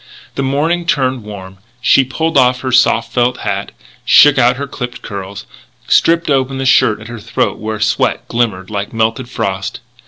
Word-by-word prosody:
The - - -3
morning 155 +6 -1
turned 130 -4 0
warm; 95 -2 -10 0.2
she 135 +2 +4
pulled 160 +5 -3
off 125 -1 +3
her 130 - -3
soft 115 -2 +2
felt 125 0 0
hat, - - -3 0.3
shook 145 -2 +6
out 125 0 +4
her 140 +2 -4
clipped 125 -3 -7
curls, 100 0 -7 0.4
stripped 170 +1 +3
open 135 -1 0
the 135 - -3
shirt 110 -5 +3
at 110 - -10
her 120 -1 -8
snowy 115 +2 -15
throat - - 0
where 110 0 -4
sweat 110 +2 0
glimmered 110 -5 -2
like 100 +1 -4
melted 115 +2 -1
frost. 95 -6 -3
125 Hz, 180 wpm, -15 LUFS, 110-135 Hz, 0.4 s, shook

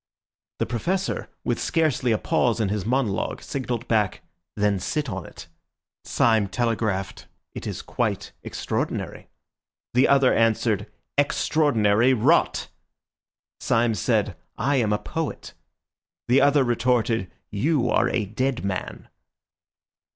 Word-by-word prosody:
The - - 0
Professor, 185 - -2
with - - -1
scarcely 155 -7 +1
a 110 - +3
pause 120 +2 +1
in 105 -3 +1
his 105 -1 -2
monologue, 120 -5 0
signalled 125 -3 -4
back, 105 -4 +1 0.3
"Then 105 -1 +1
sit 150 - -2
on 95 -3 -5
it." - - -11 0.6
Syme 110 -3 +2
telegraphed, 105 -3 -2 0.3
"It - - -6
is - - -5
quite - - -2
extraordinary." - - -3 0.7
The 125 +2 +4
other 135 -2 +4
answered, 110 -2 +1 0.3
"Extraordinary 130 -5 +3
rot!" 110 - +2 0.9
Syme 115 0 +2
said, - - 0 0.2
"I 135 +4 +1
am 110 -4 +1
a 105 - +2
poet." 160 +7 -5 0.7
The 125 +3 +4
other 140 0 +4
retorted, 120 -5 +1 0.2
"You 125 +4 +1
are 120 - +3
a 110 -4 0
dead 125 +4 -2
man." 95 -1 -4
120 Hz, 120 wpm, -24 LUFS, 105-130 Hz, 0.9 s, The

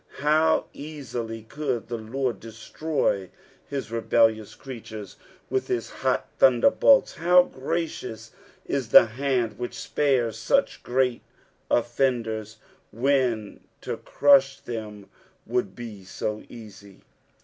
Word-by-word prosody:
How 155 +3 +3
easily 125 -7 -6
could 130 -2 -3
the 120 - -3
Lord 115 0 -3
destroy 115 - -2 0.4
hia 140 -1 -2
rebellious 110 -1 +2
creatures 110 -5 -9 0.3
with 130 0 -1
his 120 -2 -2
hot 130 -1 -1
thunderbolts! 160 - +5
how 180 +2 +6
gracioaa 130 -8 -4 0.4
ia 140 - 0
the 120 -3 +7
hand 120 -2 -1
which 120 - -4
spares 130 -6 0
such 275 0 +1
great 125 -1 0 0.5
offendera, 115 -3 0 0.4
when 120 -3 0 0.2
to - - -4
crush 135 -1 +4
them 105 -4 -7 0.4
would 115 -5 -2
be 110 -5 -8
so 105 +3 -4
easy 100 -4 -13
120 Hz, 105 wpm, -25 LUFS, 110-135 Hz, 0.5 s, the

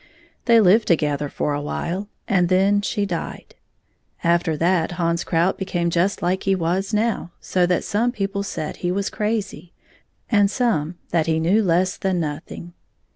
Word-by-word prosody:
They 235 -2 +6
lived 215 +2 +5
together 150 -3 +1
for 145 - -2
a 145 - -2
while, 180 +6 -3 0.2
and 180 -3 +2
then 195 +2 +3
she 205 0 -1
died. 175 -4 -5 0.7
After 170 -2 +2
that 175 +1 +1
Hans 170 -1 0
Krout 170 +2 +1
became 175 -3 -1
just 180 +4 0
as 180 +2 +2
he 195 -1 +1
was 185 +4 -1
now, 215 -4 0
so 180 -1 +1
that 180 -1 +1
some 230 +4 0
people 200 -3 -2
said 155 -6 -5
he 175 - -2
was 200 +2 -1
crazy, 205 -6 -3 0.5
and 205 -3 +3
some 185 - 0
that 165 -2 +1
he 160 0 +1
knew 180 +7 +3
less 185 0 +1
than 190 -2 0
nothing. 160 +2 -5
180 Hz, 165 wpm, -22 LUFS, 170-200 Hz, 0.7 s, They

